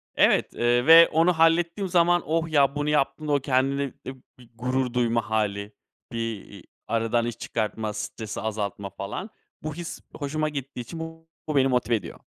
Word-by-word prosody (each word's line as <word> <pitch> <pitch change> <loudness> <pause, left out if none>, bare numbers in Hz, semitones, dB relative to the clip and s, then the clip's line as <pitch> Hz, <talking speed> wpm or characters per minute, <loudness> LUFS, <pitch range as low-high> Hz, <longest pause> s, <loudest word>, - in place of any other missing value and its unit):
Evet, - - +3
eee, 120 +1 +2
ve 165 +2 +9
onu 165 +3 +3
hallettiğim 170 +4 +2
zaman, 175 0 +4
oh, 165 +1 0
ya, 140 -2 +3
bunu 145 0 -1
yaptığımda 150 +1 0
o 140 - +3
kendinle 135 +1 +1 0.2
bi 130 - -6 0.2
bir 120 -2 -17
gurur 125 +1 -1
duyma 115 -2 0
hâli, 105 -1 -1 0.4
bir, 115 - -5 0.3
iii, 100 -3 -13 0.2
aradan 115 +1 +1
iş 120 -1 -4
çıkartma, 110 -1 -3
stresi 110 -1 -5
azaltma 100 -2 -3
falan, 100 - -6 0.3
bu 155 0 -3
his 170 0 -6 0.2
hoşuma 155 +1 -2
gittiği 135 -3 -6
için 160 +8 -8
bu 165 0 -8 0.3
beni 135 -1 +4
motive 125 -2 +1
ediyor. 95 -6 -6
135 Hz, 165 wpm, -25 LUFS, 115-160 Hz, 0.4 s, ve